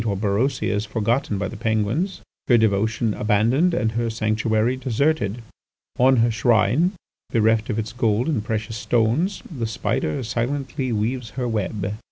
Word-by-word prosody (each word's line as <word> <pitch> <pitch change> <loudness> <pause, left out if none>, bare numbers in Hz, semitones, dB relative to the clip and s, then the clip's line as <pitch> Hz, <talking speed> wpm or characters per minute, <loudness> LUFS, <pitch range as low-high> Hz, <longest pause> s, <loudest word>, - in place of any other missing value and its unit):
Orberosia 105 +5 0
is 105 +1 0
forgotten 115 +1 0
by 100 -1 -2
the - - -8
Penguins, 110 - -1 0.3
her 120 - +6
devotion 110 +1 +1
abandoned, 115 - +2
and 110 -7 0
her 115 +1 -1
sanctuary 110 +2 0
deserted. 130 -3 0 0.6
On 130 +1 +5
her 115 -1 +3
shrine, 120 - +2 0.4
bereft 110 -1 +2
of 110 - -1
its 110 -1 -3
gold 115 +1 +1
and 145 -10 0
precious 110 +1 -3
stones, 120 - 0
the 115 -3 -2
spider 110 - -2
silently 130 +3 -2
weaves 115 +2 -1
her 125 -2 -1
web." 105 -3 -2
115 Hz, 145 wpm, -22 LUFS, 110-125 Hz, 0.6 s, her